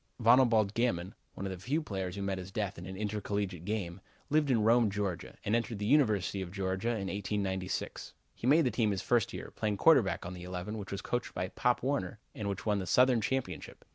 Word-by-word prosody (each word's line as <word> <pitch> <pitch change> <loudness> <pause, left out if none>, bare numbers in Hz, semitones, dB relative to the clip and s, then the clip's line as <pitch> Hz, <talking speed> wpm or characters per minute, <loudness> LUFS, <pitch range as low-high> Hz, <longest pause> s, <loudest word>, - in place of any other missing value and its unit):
Vonalbalde 115 -3 +5
Gammon, 110 -6 0 0.2
one 95 - -5
of 95 - -3
the 95 - -6
few 135 - 0
players 95 - -4
who 100 - -4
met 95 -1 -1
his 90 +1 -8
death 100 -4 -3
in 90 - -8
an 95 0 -7
intercollegiate 100 -4 -3
game, 95 -4 -3 0.3
lived 150 -1 +3
at 125 - +4
Rome, 115 +1 +4
Georgia, 100 -3 -3
and 105 - +2
entered 115 -1 -1
the 105 - -3
University 105 -7 +2
of 90 -2 -6
Georgia 95 +2 -2
in 110 -5 -1
1896. 95 -2 -3 0.2
He 120 - -4
made 155 +3 +5
the 125 - +2
team 110 0 +1
his 95 -2 -2
first 120 -4 +2
year, - - -7
playing 105 -2 -1
quarterback 125 - +4
on 90 - -5
the 90 - -9
eleven 90 +4 -5
which 100 - -7
was 100 - -4
coached 120 0 -3
by 90 - -2
Pop 125 +3 +1
Warner 135 -3 -1 0.2
and 105 -2 -3
which 100 0 -4
won 105 -2 +2
the 95 - -4
Southern 125 +3 +4
championship. 135 +3 -3
105 Hz, 220 wpm, -32 LUFS, 95-120 Hz, 0.3 s, Vonalbalde